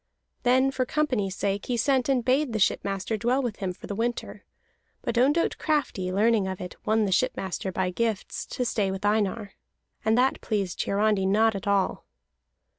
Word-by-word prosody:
Then 260 +2 +3
for 260 - 0
company's 250 -9 -1
sake 200 0 -2
he 245 - 0
sent 260 +2 +2
and 255 -4 +1
bade 265 0 +2
the - - 0
shipmaster 200 +1 0
dwell 245 +5 +1
with 235 -4 -3
him 190 -2 -2
for 180 - -11
the - - -4
winter; 235 +3 -3 0.6
but - - -2
Ondott 285 +8 +2
Crafty, 280 - 0
learning 210 +1 +2
of 190 -1 -4
it, 180 - -7
won 220 0 +3
the 195 - -1
shipmaster, 190 0 -1
by 185 0 -1
gifts, 225 +1 -2
to 250 - -3
stay 210 -4 0
with 190 +1 -4
Einar. 205 -1 0 0.5
And 220 +1 +2
that 260 +2 +2
pleased 200 -5 -1
Hiarandi 200 -1 +1
not 220 +3 +3
at 195 0 -6
all. 200 -2 0
215 Hz, 180 wpm, -26 LUFS, 195-250 Hz, 0.6 s, Then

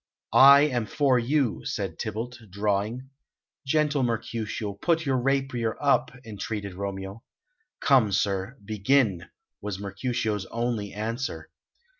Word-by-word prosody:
"I 140 +1 +9
am 125 -7 +1
for 135 -4 +2
you," 130 -1 0
said 95 -6 -4
Tybalt, 115 +3 -4
drawing. 105 +6 -2 0.6
"Gentle 150 -1 +2
Mercutio, 115 -3 -2
put 165 - 0
your 135 -2 +1
rapier 130 -3 0
up," 140 -1 +2 0.2
entreated 105 -2 -5
Romeo. 95 +2 -6 0.6
"Come, 130 -7 +4
sir, 100 +4 -1
begin," 105 -2 +1 0.3
was 100 -2 -4
Mercutio's 105 0 -2
only 115 -3 -2
answer. 115 +6 -4
115 Hz, 110 wpm, -26 LUFS, 100-135 Hz, 0.6 s, I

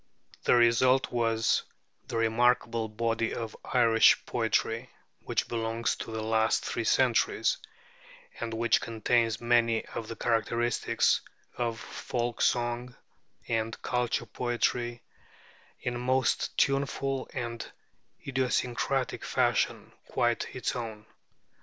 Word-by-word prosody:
The - - +5
result 120 +2 +4
was 115 -2 +2 0.5
the - - -3
remarkable 115 0 +2
body 115 +1 -1
of 115 -2 -5
Irish 115 -3 +4
poetry 115 +1 0 0.4
which - - 0
belongs 115 0 -1
to - - -6
the 110 -1 -3
last 110 0 +2
three - - -2
centuries, - - +2 0.8
and 115 -1 -3
which 115 +1 +2
contains 115 -1 +1
many 120 -1 +2
of 115 - -6
the 115 - -6
characteristics 115 0 +1 0.3
of 115 -2 -2
folk 120 -1 -4
song 120 +1 0 0.5
and 115 0 -1
culture 125 -1 0
poetry, 120 +1 -1 0.8
in 125 - -2
a 120 - -4
most 130 -2 0
tuneful 135 -1 0
and 120 -2 -5 0.5
idiosyncratic 130 0 -1
fashion - - 0 0.2
quite - - 0
its - - -2
own. 110 -3 -6
120 Hz, 110 wpm, -29 LUFS, 115-125 Hz, 0.8 s, The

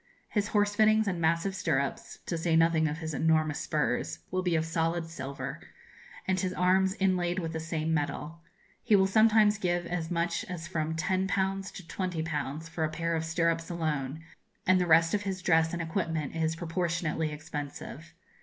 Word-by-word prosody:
His 205 -2 0
horse 205 -1 +2
fittings 215 0 +4
and 180 -4 -1
massive 170 +4 +1
stirrups 140 -7 -1
(to 170 - -2
say 165 0 +1
nothing 165 -1 +4
of 150 +1 -3
his 160 -1 -5
enormous 155 -1 +2
spurs) 120 - -1
will 185 - 0
be 180 -2 +1
of 160 0 +1
solid 165 +1 0
silver, 140 -2 -6 0.7
and 190 0 +1
his 185 0 -1
arms 190 +1 +3
inlaid 180 -2 +1
with 165 -3 -3
the 160 - -2
same 160 0 -2
metal. 155 +2 -2 0.4
He 220 -3 +4
will 190 -1 +5
sometimes 215 +1 +4
give 175 -2 0
as 170 -2 -3
much 170 -1 0
as 170 -2 -6
from 160 -2 -2
10_l_. 190 +2 0
to 190 - -8
20_l_. 160 -4 -3
for 165 0 -3
a 155 - +1
pair 165 +1 -1
of 160 - -1
stirrups 165 0 0
alone, 155 -4 -2 0.4
and 185 0 +4
the 180 - 0
rest 165 0 +5
of 205 - +1
his 190 -2 -4
dress 160 -2 +3
and 170 -1 -2
equipment 160 -3 -2
is 160 0 0
proportionately 165 -2 -1
expensive. 150 +1 -7
165 Hz, 175 wpm, -29 LUFS, 160-185 Hz, 0.7 s, will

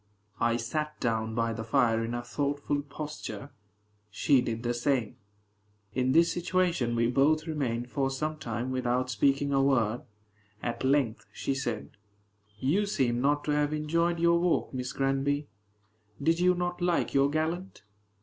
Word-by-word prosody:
I 115 0 +2
sat 150 +6 -3
down 110 -2 -1
by 115 0 0
the 110 - -5
fire 115 -1 +2
in 115 +1 -3
a 120 - -3
thoughtful 145 +3 -1
posture. 145 -1 -7 0.6
She 125 +6 +3
did 115 -1 -3
the 120 0 0
same. 120 -2 0 0.8
In 130 +2 +1
this 165 +4 +5
situation 175 -9 0
we 115 0 +2
both 140 +6 +3
remained 125 -6 -2
for 135 -2 0
some 155 +3 -3
time 120 0 -3
without 125 0 0
speaking 140 +4 +2
a 135 - +4
word. 120 -4 +2 0.6
At 120 +1 -3
length 130 -4 +1
she - - -2
said, 120 -5 -3 0.7
"You 180 - +1
seem 125 - +1
not 145 +2 +2
to 150 - -1
have 150 0 +1
enjoyed 170 +3 0
your 170 0 +4
walk, 175 -4 +1
Miss 125 -1 -3
Granby: 140 +2 0 0.7
did 165 +1 +2
you 180 0 +4
not 175 0 -2
like 175 -1 +1
your 140 0 +4
gallant?" 160 +4 -2
135 Hz, 155 wpm, -29 LUFS, 120-155 Hz, 0.8 s, this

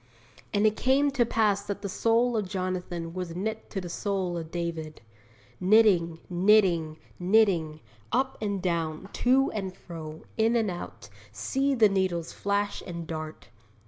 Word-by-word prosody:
'And 205 +1 +2
it 215 0 +3
came 275 +4 +3
to 245 -4 +2
pass 210 -4 +2
that 200 0 -5
the - - -1
soul 230 +4 +2
of 210 -4 -1
Jonathan 180 -3 -3
was 180 -2 -5
knit 220 +4 -4
to 195 - -3
the 180 - -6
soul 190 0 -2
of 165 -2 -5
David.' 165 -2 -4 0.6
Knitting, 185 -4 +4
knitting, 175 -4 +3 0.2
knitting; 175 -6 +2 0.3
up 265 0 +1
and 200 -3 -2
down, 170 0 -2
to 265 +2 +3
and 190 -3 -4
fro, 160 -2 -9
in 225 +1 +3
and 220 -4 +1
out, 175 - -8 0.2
see 275 +1 0
the 225 -3 +6
needles 185 -4 -1
flash 200 0 -1
and 170 -2 -5
dart! 155 -5 -7
190 Hz, 150 wpm, -27 LUFS, 170-215 Hz, 0.6 s, the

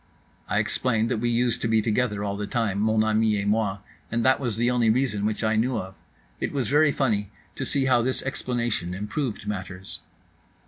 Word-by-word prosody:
—I - - +1
explained 115 -2 +1
that 115 - 0
we 120 +1 0
used 120 0 +1
to - - 0
be 110 0 +3
together 105 -1 0
all 100 -1 -2
the 105 0 -4
time, 110 -6 -1
mon 110 +1 +3
ami 110 -1 +2
et 100 - -2
moi; 105 -2 +1 0.3
that 115 +3 +2
was 120 -6 -2
the 120 +1 +2
only 120 -2 +2
reason 110 -4 +1
which 110 +1 -2
I 110 0 +2
knew 120 +4 +1
of.—It 95 +1 -8
was 135 -5 -1
very 150 +1 +4
funny 105 -8 0 0.2
to - - -4
see 135 -2 +3
how 125 -2 +4
this 130 +2 -1
explanation 120 -8 -2
improved 105 +3 -3
matters. 95 -2 -5
110 Hz, 190 wpm, -25 LUFS, 105-125 Hz, 0.3 s, very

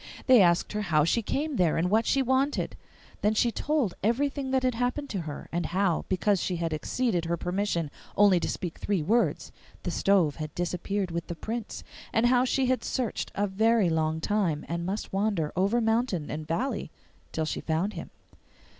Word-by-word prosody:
They 255 -4 +7
asked 170 -2 +3
her 210 - -1
how 160 -6 +2
she 200 +9 +2
came 290 +5 -2
there 170 -4 +2
and 165 +2 +1
what 220 +2 +3
she 275 -1 +3
wanted. 265 +3 0 0.5
Then 210 +1 +2
she 235 +2 +3
told 285 - 0
everything 270 +5 0
that 260 0 +1
had 255 -1 +2
happened 250 +4 -2
to 195 - -2
her, 145 - -7
and 175 0 -1
how, 185 -2 0
because 190 +1 +2
she 180 - -1
had 165 -1 -2
exceeded 180 +2 -1
her 170 +1 -1
permission 180 -3 -1 0.3
only 200 -3 +6
to - - -2
speak 175 -3 -4
three 195 -6 0
words, 210 -3 +1 0.3
the 175 - -2
stove 175 -4 +2
had 155 -1 -6
disappeared 180 +2 -2
with 170 0 -3
the 170 - -5
Prince; 225 +5 -5 0.3
and 225 - +2
how 250 +1 +4
she 265 +1 +1
had 255 0 +1
searched 250 -5 -2
a 205 - +1
very 210 -1 +2
long 160 0 0
time, 170 -5 0
and 170 +1 -3
must 195 +1 -4
wander 195 -6 0
over 200 +6 +2
mountain 225 -7 0
and 155 +1 -5
valley 245 +13 -2 0.4
till 160 - -1
she - - -3
found 170 +6 -1
him. - - -7
200 Hz, 190 wpm, -28 LUFS, 170-235 Hz, 0.5 s, They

